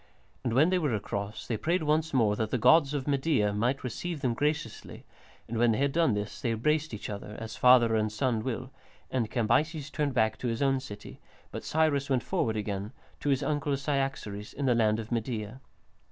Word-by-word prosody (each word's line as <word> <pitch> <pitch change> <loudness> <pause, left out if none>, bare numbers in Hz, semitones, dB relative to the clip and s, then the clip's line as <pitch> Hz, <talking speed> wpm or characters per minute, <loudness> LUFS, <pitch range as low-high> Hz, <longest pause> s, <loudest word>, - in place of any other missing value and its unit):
And 120 - -1
when 150 +8 +4
they 185 - +3
were 145 -9 0
across, 100 +1 -4
they 115 - -2
prayed 170 - 0
once 155 +1 +1
more 110 -6 +3
that 110 0 -1
the 125 - 0
gods 145 +4 +5
of 140 -1 -3
Media 135 -7 +1
might 120 +6 0
receive 150 +6 -4
them 125 -4 +1
graciously, 150 -3 -3 0.4
and 115 0 -3
when 120 -1 +4
they - - -1
had 140 +1 +1
done 160 -7 +2
this 105 0 -5
they 120 - 0
embraced 150 +7 0
each 105 - -6
other, 105 0 -7
as 110 -1 -6
father 125 -3 +6
and 110 -1 +1
son 110 0 0
will, 130 +1 -4 0.4
and 120 -5 0
Cambyses 145 +6 0
turned 145 -4 -1
back 110 -2 +2
to 125 - -2
his 115 +3 -1
own 135 -1 +2
city, 105 -6 -10 0.3
but - - -6
Cyrus 150 -3 +1
went 130 -4 +1
forward 110 -1 -1
again, 100 0 -3 0.3
to 145 - -2
his 135 -2 +2
uncle 145 -2 0
Cyaxares 135 -7 -3
in 140 - -2
the 125 - +4
land 110 -2 +2
of 115 +1 -7
Media. 115 0 -3
125 Hz, 205 wpm, -29 LUFS, 110-145 Hz, 0.4 s, father